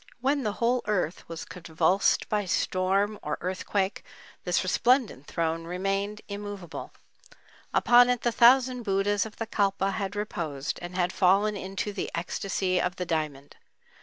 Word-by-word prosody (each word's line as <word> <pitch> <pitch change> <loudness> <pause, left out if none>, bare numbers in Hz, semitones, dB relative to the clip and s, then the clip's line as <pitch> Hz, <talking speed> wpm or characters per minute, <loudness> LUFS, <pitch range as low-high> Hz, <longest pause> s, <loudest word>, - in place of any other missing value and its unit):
When 275 +3 +1
the 210 -5 -1
whole 240 +3 +1
earth 180 -7 -1
was 165 -1 -6
convulsed 170 +2 +1
by 210 -1 0
storm 195 +3 0
or 150 0 -3
earthquake 190 +2 -2 0.4
this 180 0 +1
resplendent 220 - +1
throne 165 0 -2
remained 195 +4 -2
immovable. 200 -4 -7 0.8
Upon 245 0 +6
it 245 -1 +1
the 240 - +1
thousand 250 +2 +5
Buddhas 205 0 +1
of 215 - -14
the 225 - -4
Kalpa 195 -2 0
had 195 +1 -3
reposed 160 -9 -3
and 175 +1 -7
had 180 0 0
fallen 195 +3 +3
into 195 +1 -4
the 195 - -3
"ecstasy 185 +1 -1
of 180 - -1
the 180 - -3
diamond." 155 -4 -3
195 Hz, 145 wpm, -27 LUFS, 180-210 Hz, 0.8 s, Upon